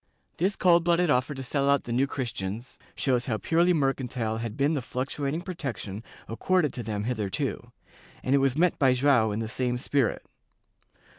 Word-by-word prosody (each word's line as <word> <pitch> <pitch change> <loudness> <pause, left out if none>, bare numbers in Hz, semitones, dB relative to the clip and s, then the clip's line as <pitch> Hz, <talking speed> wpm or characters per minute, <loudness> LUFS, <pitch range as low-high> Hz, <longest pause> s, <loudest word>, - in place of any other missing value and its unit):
This 190 +4 +1
cold 175 -2 +4
blooded 170 -1 +3
offer 130 +3 +1
to 135 - -6
sell 140 +2 0
out 140 -1 +3
the 120 - -6
New 130 +4 +2
Christians 115 -4 -5 0.2
shows 125 -3 0
how 115 -4 0
purely 170 +8 +2
mercantile 130 -7 -1
had 115 -2 -5
been 140 +3 +2
the 145 - -1
fluctuating 140 +5 -3
protection 115 - -5 0.2
accorded 155 +7 +1
to 125 - -4
them 105 -2 -3
hitherto, 105 -5 -2 0.5
and 130 - +1
it 140 - +5
was 135 0 +1
met 175 +1 +2
by 130 -2 +5
Joao 125 -5 +3
in 105 +2 -2
the 110 - -3
same 125 +1 -1
spirit. 130 -1 0
130 Hz, 175 wpm, -27 LUFS, 115-145 Hz, 0.5 s, it